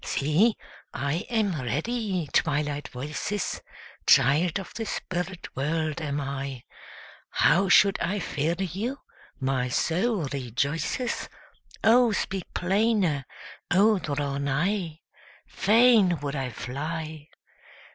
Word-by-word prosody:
See, 165 +11 +2 0.4
I 145 +5 -2
am 205 - 0
ready, 185 - -2
Twilight 145 -2 0
voices! 150 +10 -4 0.5
Child 145 +7 +4
of 195 - -9
the 225 - -4
spirit 180 -1 -4
world 155 +3 -1
am 145 -2 -2
I; 135 -2 -4 0.7
How 190 +2 +3
should 195 +2 +5
I 205 - 0
fear 160 -3 -1
you? 195 - -3 0.4
my 130 -1 0
soul 180 - 0
rejoices, 140 - -2 0.5
O 240 +1 +5
speak 190 -2 -3
plainer! 190 - +1 0.4
O 205 +3 +4
draw 145 -3 -2
nigh! 160 +4 -1 0.4
Fain 215 - +4
would 145 0 -3
I 135 -2 -2
fly! 155 +5 -5
165 Hz, 105 wpm, -26 LUFS, 140-200 Hz, 0.7 s, should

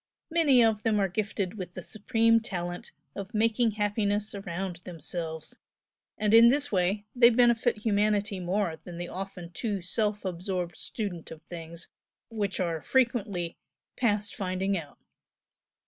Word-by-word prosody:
Many 290 -7 +5
of 220 -2 +2
them 215 -2 +2
are 195 - +3
gifted 200 0 -2
with 180 -1 -6
the 185 - -6
supreme 230 +2 +2
talent 175 -5 -5 0.2
of 200 +3 -6
making 225 +1 +2
happiness 205 0 0
around 190 -2 -4
themselves, 165 -2 -6 0.6
and 210 0 +1
in 230 +1 +9
this 285 +3 +3
way 195 +2 +1
they 240 -1 +8
benefit 240 -1 +3
humanity 205 -2 +1
more 180 -2 -1
than 175 -2 -8
the 175 0 -5
often 185 -2 -6
too 200 0 -3
self 210 +2 0
absorbed 180 -1 -3
student 185 -3 -5
of 160 -1 -10
things 170 -1 -8 0.4
which 205 -4 -2
are 170 -3 -1
frequently 210 - 0 0.4
"past 210 -4 0
finding 190 +1 -1
out." 165 -5 -6
200 Hz, 140 wpm, -28 LUFS, 180-220 Hz, 0.6 s, in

